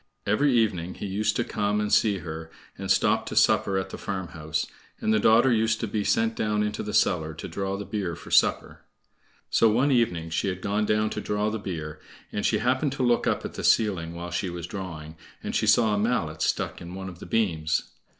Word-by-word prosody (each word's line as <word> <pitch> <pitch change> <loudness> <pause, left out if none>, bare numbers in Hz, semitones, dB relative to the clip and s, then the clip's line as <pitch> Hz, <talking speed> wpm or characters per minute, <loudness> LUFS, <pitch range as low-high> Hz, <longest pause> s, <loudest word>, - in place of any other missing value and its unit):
Every 135 +8 +2
evening 95 -7 +1
he - - -6
used 105 +2 0
to 120 - +1
come 105 -2 -1
and 105 0 -1
see 105 -3 +4
her, 80 0 -6 0.3
and - - -6
stop - - +2
to - - -5
supper 95 - +3
at 95 - -3
the - - -7
farmhouse, 80 -5 -3 0.3
and 110 - +1
the 110 - +3
daughter 115 +5 +5
used 110 0 +1
to 115 - -1
be 105 0 -1
sent 225 - +2
down 105 - 0
into 105 0 -2
the 105 - -4
cellar 80 -6 +1
to - - -7
draw 95 0 -3
the 100 - -6
beer 95 -6 -3
for - - -12
supper. - - +2 0.7
So 115 - +5
one 125 +7 +2
evening 85 -10 +1
she 85 - 0
had 90 -1 -2
gone 105 +1 0
down 105 0 +1
to - - -3
draw 105 +1 -1
the 110 - -3
beer, 80 -6 -5 0.3
and 105 - -3
she - - +2
happened 130 +3 +1
to 135 - -2
look 120 -1 +2
up - - 0
at - - -6
the - - -6
ceiling 90 -7 +2
while 85 +1 -6
she 90 +2 -2
was 85 -1 -5
drawing, 85 -4 -7 0.3
and - - -4
she - - +1
saw 110 -2 +4
a 105 - +1
mallet 100 -9 -1
stuck - - -1
in 85 +1 -8
one 95 0 -6
of 90 -2 -9
the - - -9
beams. 80 -9 0
100 Hz, 225 wpm, -26 LUFS, 85-110 Hz, 0.7 s, daughter